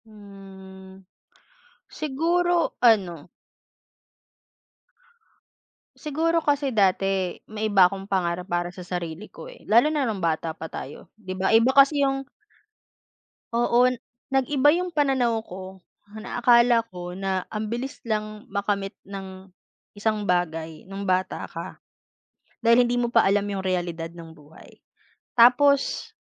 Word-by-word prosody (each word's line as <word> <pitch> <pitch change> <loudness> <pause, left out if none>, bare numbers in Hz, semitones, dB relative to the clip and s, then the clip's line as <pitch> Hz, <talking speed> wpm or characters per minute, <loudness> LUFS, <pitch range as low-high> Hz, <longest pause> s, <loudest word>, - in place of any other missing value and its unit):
Mm, 190 -2 -14 0.8
siguro 340 +4 0
ano, 185 -9 +2 2.7
Siguro 325 +3 0
kasi 285 -3 0
dati, 195 -3 +1 0.2
may 215 0 -2
iba 200 -3 +5
akong 195 +2 0
pangarap 180 -2 -1
para 175 -1 -2
sa 180 - -13
sarili 175 +1 -5
ko - - -11
eh - - -17
lalo 240 +8 +5
na 290 -4 0
nung 210 -5 -3
bata 160 -1 -1
pa 160 - -8
tayo, 140 - -9
'di 185 -3 -6
ba 190 0 0
iba 225 +2 +5
kasi 280 +1 +6
yung 270 0 -2 1.3
Oo, 240 +1 +3 0.5
nag-iba 270 +1 +3
yung 355 +1 -2
pananaw 255 -6 +1
ko, 190 -1 -10 0.4
na - - -5
akala 240 0 +5
ko 180 -1 -8
na 190 0 -2
ambilis 235 +6 -4
lang 215 +1 -3
makamit 200 -2 -2
ng 190 -1 -9 0.4
isang 210 0 -2
bagay 165 -3 -2
nung 195 +1 -6
bata 185 0 -1
ka, - - -8 0.8
dahil 235 +1 +5
hindi 245 - 0
mo 240 -1 -1
pa 230 -4 +4
alam 200 +1 +2
yung 200 -1 -3
realidad 175 -3 -2
ng 165 -1 -11
buhay, 155 0 -18 0.5
tapos. 270 +4 +4
205 Hz, 125 wpm, -24 LUFS, 185-245 Hz, 2.7 s, kasi